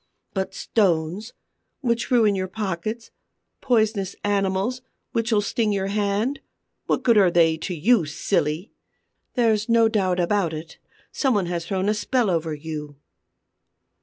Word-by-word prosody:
But 190 0 -3
stones, 190 +1 0 0.5
which 235 -3 0
ruin 225 -5 +4
your 185 -1 -2
pockets; 215 +3 -4 0.5
poisonous 215 -6 +1
animals, 200 +4 0 0.3
which'll 230 -3 +1
sting 215 +1 0
your 195 -1 -1
hand: 210 +6 0 0.5
what - - 0
good 230 -4 +5
are 190 -3 +5
they 165 -2 +4
to 180 +3 -4
you, 195 +3 +3
silly? 155 +3 -1 0.6
There's 220 -2 +2
no 230 -1 +5
doubt 190 -5 +1
about 175 -1 +1
it; 160 +1 -9 0.3
some 265 -4 +1
one 200 -3 +1
has 170 -1 -3
thrown 190 +1 -1
a 210 - +3
spell 220 0 0
over 165 -2 -1
you!" 150 -1 -7
200 Hz, 135 wpm, -23 LUFS, 175-225 Hz, 0.6 s, good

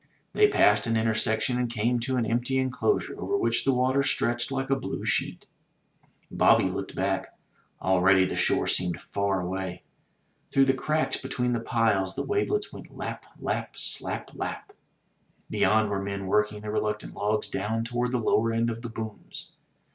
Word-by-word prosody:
They 420 - +5
passed 105 - +4
an 115 -1 +2
intersection, 110 +2 +1
and 125 -1 0
came 120 +2 0
to 130 +2 -1
an 120 - +1
empty 120 +4 0
enclosure 130 - 0
over 400 - 0
which 390 - +1
the 135 - +4
water 130 +2 +2
stretched 120 -2 0
like 135 0 -2
a - - +5
blue 135 - -5
sheet. - - 0 0.9
Bobby - - +5
looked - - -5
back. - - -2 0.4
Already 95 0 +4
the - - -3
shore - - +2
seemed 90 -3 0
far 100 -2 -1
away. 90 0 -4 0.7
Through 135 0 +5
the 135 - +3
cracks 145 +1 0
between 125 -1 -2
the 120 - 0
piles 110 -5 +1
the - - -2
wavelets 410 0 -1
went - - -10
lap, - - -6
lap, - - -3
slap, - - -1
lap! 400 - -5 0.8
Beyond 110 -1 +3
were 100 -1 -1
men 100 0 -4
working 105 +2 +1
the 105 0 -5
reluctant 105 0 -2
logs 105 +1 -1
down 110 +2 -2
toward 120 +1 -1
the 125 - +1
lower 115 0 +2
end 115 +1 +1
of 115 0 -6
the 120 - -6
booms. 110 -2 -8
115 Hz, 170 wpm, -27 LUFS, 105-130 Hz, 0.9 s, They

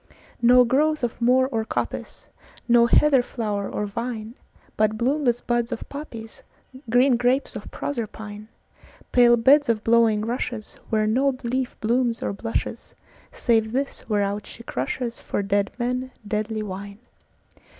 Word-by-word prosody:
No 250 +1 +7
growth 300 +4 +1
of 235 0 -2
moor 255 +2 +4
or 225 -1 0
coppice, - - -4 0.4
No 235 -1 +5
heather 275 +1 +5
flower 210 -5 -3
or 210 - -2
vine, 225 +1 -5 0.4
But 215 0 +1
bloomless 245 0 +1
buds 240 0 -1
of - - -5
poppies, 230 -6 -8 0.5
Green 245 +2 +4
grapes 250 +3 +1
of - - -7
Proserpine, 215 -5 -5 0.6
Pale 240 -1 +6
beds 275 +4 +5
of 220 -2 +1
blowing 225 -2 +3
rushesWhere 225 -2 -2
no 260 +4 +2
leaf 255 +1 -2
blooms 235 +1 +1
or - - -1
blushes, 225 +3 -4 0.4
Save 225 -1 +1
this 275 -1 -3
whereout 205 -1 -1
she 230 - -11
crushesFor 230 - -3
dead 200 0 +1
men 250 +1 -2 0.2
deadly 215 +1 -2
wine. 200 0 -7
235 Hz, 130 wpm, -24 LUFS, 215-250 Hz, 0.6 s, No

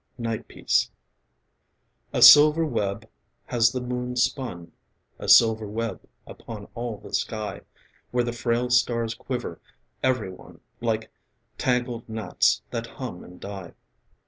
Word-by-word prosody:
NIGHT 115 -2 -4
PIECE - - +1 1.2
A - - +3
silver 150 +2 +9
web 100 -9 -2 0.4
has 115 -2 +3
the 125 - -3
moon 125 0 -4
spun, 120 -8 -1 0.5
A - - -5
silver 110 -2 +6
web 110 -3 -4 0.2
upon 105 -3 -9
all 120 -2 -4
the - - -13
sky, 105 -3 -3 0.5
Where 125 0 +1
the 120 0 -3
frail 120 +1 -1
stars 115 -2 +2
quiver, 120 +1 -5 0.4
every 125 -7 0
one 90 - -15 0.2
Like 110 -1 -2 0.5
tangled 125 -2 -1
gnats 110 - +1
that 115 0 -3
hum 115 -7 -7
and 90 0 -14
die. 95 -4 -8
115 Hz, 125 wpm, -25 LUFS, 110-125 Hz, 1.2 s, silver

